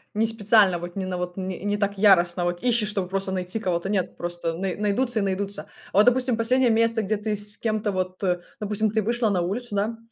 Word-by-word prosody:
не 220 +2 +2
специально, 215 -4 +4
вот 175 0 -8
не 190 -1 -3
на 180 -1 -3
вот 180 +1 -5
не, 185 -1 -5
не 205 0 0
так 200 -1 -1
яростно, 180 -3 +4
вот 175 0 -2
ищешь, 235 -4 +3
чтобы 195 -3 -1
просто 195 +1 -1
найти 185 +3 -2
кого-то. 180 -2 -2
Нет, 195 -3 -1
просто 175 -1 -4
най 185 0 -3
найдутся 215 +3 0
и - - 0
найдутся. 195 +1 -2 0.3
А - - -2
вот, 210 - +7
допустим, 250 -1 +3
последнее 250 +2 +3
место, 230 0 +2
где 215 +1 -1
ты 210 0 -2
с 205 0 -1
кем-то, 215 -2 -1
вот, 185 0 -4
э, 180 -1 +1 0.2
допустим, 210 0 0
ты 220 - +1
вышла 235 +1 0
на 185 -3 +1
улицу, 210 +5 -3
да, 215 +3 -1
205 Hz, 230 wpm, -24 LUFS, 185-220 Hz, 0.3 s, вот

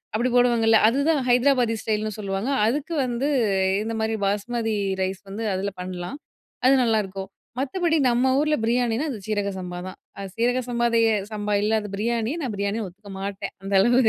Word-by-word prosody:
அப்பி 225 - 0
D - - -1
போடுவாங்கல்ல, 230 -2 +4
அதுதான் 280 +4 +2
ஹைதராபாதி 245 -2 +3
ஸ்டைல்ன்னு 215 0 -1
சொல்லுவாங்க. 195 +3 -2 0.2
அதுக்கு 290 +7 -1
வந்து 245 +2 -1 0.6
இந்த 225 - -3
மாதிரி 220 0 0
பாஸ்மதி 225 +2 -1 0.3
ரைஸ் 190 0 -3
வந்து 220 +3 -4
அதுல 195 +2 -2
பண்ணலாம். 180 +8 -6 0.5
அது 265 +1 +7
நல்லாயிருக்கும். 195 -4 -1 0.3
மத்தபடி 325 +4 +1
நம்ம 250 +2 +3
ஊர்ல 300 +1 +2
பிரியாணினா 235 +2 +1
அது 255 - -4
சீரக 205 -2 0
சம்பா 180 -1 -6
தான். 185 - -9 0.2
அது 195 -1 -5
சீரக 245 +2 +2
சம்பாதேய 235 -1 +2 0.2
சம்பா 210 -1 -2
இல்லாத 215 -1 0
பிரியாணிய 230 +5 -1
நான் 255 -7 -3
பிரியாணின்னு 200 +2 -2
ஒத்துக்க 200 +3 -13
மாட்டேன். 200 0 -4
அந்த 195 +1 -4
அளவு 240 +5 +4
225 Hz, 160 wpm, -24 LUFS, 200-245 Hz, 0.6 s, அது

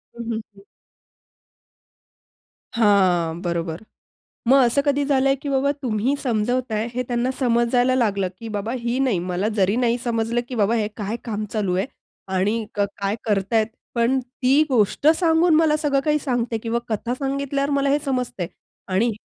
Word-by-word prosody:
हं, 235 - -6
हं, 220 - -2
हं. 195 - -16 2.1
हां, 185 -7 +3
बरोबर. 170 0 -3 0.7
मग 270 +2 +7
असं 240 +4 +2
कधी 285 0 +1
झालंय, 275 -1 +3
की 280 +2 -7
बाबा 275 +1 +2
तुम्ही 240 +2 0
समजवताय 235 -1 0
हे 250 - 0
त्यांना 245 +1 0
समजायला 245 0 +2
लागलं, 200 -7 +1
की 230 - -7
बाबा 210 +1 -3
ही 235 +2 -2
नाही 255 -8 +2
मला 180 +3 -1
जरी 195 +2 +2
नाही 240 -1 +1
समजलं, 230 0 0
की 255 - -5
बाबा 220 0 +2
हे 215 -2 0
काय 210 +1 -3
काम 215 -2 -3
चालू 200 -5 0
आहे 190 - 0 0.5
आणि 210 +5 +1
क - - -3 0.2
काय 200 +1 0
करतायेत 215 +1 +1 0.3
पण 240 +2 +2
ती 255 +3 +2
गोष्ट 245 +2 +1
सांगून 330 -1 +3
मला 310 -1 +4
सगळं 290 -3 +1
काही 300 +1 +1
सांगते 245 -5 -1
किंवा 230 +1 -1
कथा 230 +2 -2
सांगितल्यावर 275 +1 -2
मला 280 0 +1
हे 290 - +3
समजतंय. 250 -9 -2 0.4
आणि 195 +6 +2
235 Hz, 160 wpm, -22 LUFS, 210-270 Hz, 2.1 s, मग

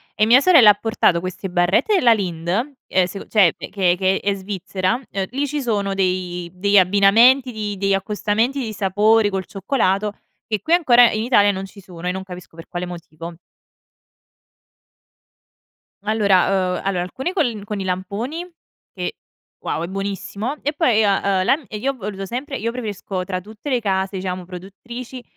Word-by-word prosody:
E 210 - +3
mia 240 +4 +7
sorella 280 - +7
ha - - +3
portato 205 -5 +1
queste 185 +2 -6
barrette 180 - +2
della 245 -11 +5
Lindt, 175 -6 -4
ehm, 225 -3 0
s 195 +2 -8
cioè, 195 -7 +4
che 185 -3 0
che 190 +1 +1
è 200 0 0
Svizzera. 190 +2 -2
Ehm, 195 -1 -2
lì 280 +3 -1
ci 290 +1 -3
sono 205 -5 -1
dei 180 -2 -2
degli 200 +2 +2
abbinamenti 215 +8 +5
di 210 -3 -4
degli 195 0 +1
accostamenti 210 +6 0
di 225 -4 -4
sapori 210 +2 +2
col 190 -2 -3
cioccolato 200 -1 -1 0.3
che 215 -2 -2
qui 325 - 0
ancora 245 -9 +6
in 215 0 -2
Italia 205 -4 +4
non 195 0 -5
ci 195 +1 -14
sono 180 -2 -9
e 180 - +1
non 190 +1 -5
capisco 180 -3 -11
per 165 - -11
quale 175 0 -4
motivo. 170 -1 -9 2.7
Allora 195 -3 +2
ehm, - - -6
allora 190 -2 -1
alcuni 265 - -4
col 240 - -1
con 205 0 -5
i 195 - -3
lamponi 200 - -4 0.4
che, - - -5 0.5
wow, 160 - -2
è - - -3
buonissimo; 200 +6 -4
e 290 - 0
poi 290 -8 +2
io 215 - +3
ho, - - +3
ehm, 190 -2 0
la 270 - +4
n 300 -4 -13
e 210 - -6
io 270 +6 -1
ho - - -10
voluto 195 -4 -6
sempre 260 +7 -5
io 230 +2 -2
preferisco 205 -5 -5
tra 185 0 -3
tutte 215 +8 -9
le 255 -3 +1
case 195 -2 -1
diciamo 185 -1 -4
produttrici 235 +8 -9
200 Hz, 180 wpm, -20 LUFS, 185-230 Hz, 2.7 s, mia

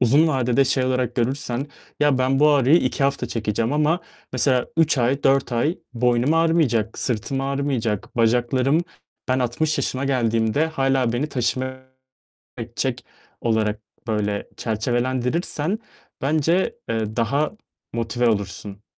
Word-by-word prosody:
uzun 140 +7 +4
vadede 130 -2 +2
şey 130 0 +1
olarak 130 -2 0
görürsen, 125 +1 -1 0.3
"Ya, 145 -3 +3
ben 130 +1 +2
bu 150 0 +6
ağrıyı 140 +1 +5
2 130 +2 -1
hafta 140 0 0
çekeceğim 110 +2 -1
ama 150 +4 +2 0.3
mesela 130 0 +2
3 165 -4 +3
ay, 130 +4 +1
4 135 -1 +2
ay 145 +9 0
boynum 125 +4 +2
ağrımayacak, 155 -10 +2
sırtım 125 +3 -1
ağrımayacak, 135 -7 -2
bacaklarım 125 +6 +2 0.4
ben 130 - +2
60 130 +6 0
yaşıma 130 +1 -1
geldiğimde 115 +1 +1
hâlâ 135 -5 +1
beni 130 +6 -1
taşıma 130 0 -1 0.8
edecek." - - -3 0.4
olarak 110 -2 0 0.3
böyle 105 -2 -1
çerçevelendirirsen 125 - -1 0.4
bence, 160 +6 +1
eee, 110 -1 -2
daha 140 +6 +1 0.4
motive 115 +1 0
olursun. 100 -1 -3
130 Hz, 125 wpm, -22 LUFS, 115-140 Hz, 0.8 s, bu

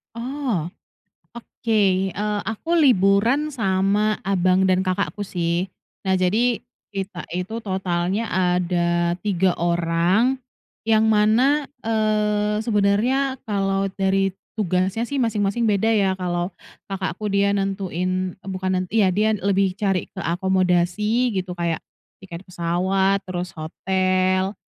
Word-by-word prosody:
Oh. 240 - -2 0.7
Oke, 200 -5 0
eee, 210 +1 -1
aku 225 +10 -3
liburan 240 - +3
sama 205 -1 +1
abang 185 -1 +2
dan 185 0 +3
kakakku 200 +3 -1
sih. 175 +1 -1 0.4
Nah 190 - +2
jadi 220 +6 +1 0.3
kita 190 -3 -5
itu 180 +6 -3
totalnya 190 +1 -1
ada 175 -1 +1
3 190 -3 +1
orang 175 +8 +2 0.5
yang 220 -1 +4
mana, 235 +8 +3 0.2
eee, 210 -1 +1
sebenernya 235 +6 +1
kalau 195 -1 0
dari 195 0 +1 0.2
tugasnya 190 +3 0
sih 285 - -2
masing-masing 220 0 0
beda 205 +2 +2
ya, 195 -3 +2
kalau 175 -1 -2 0.4
kakakku 195 +1 -3
dia 200 0 +3
nentuin, 185 -2 -2
eee, - - -15
bukan 185 0 -3
nent 185 - -5
iya 210 -4 +4
dia 215 +2 +2
lebih 195 -1 +1
cari 195 -3 0
ke - - -7
akomodasi 190 +6 +1
gitu, 185 -1 -3
kayak 170 -2 -1 0.4
tiket 175 -2 -9
pesawat, 185 +3 0
terus 180 0 -3
hotel. 185 +3 0
195 Hz, 115 wpm, -22 LUFS, 185-215 Hz, 0.7 s, yang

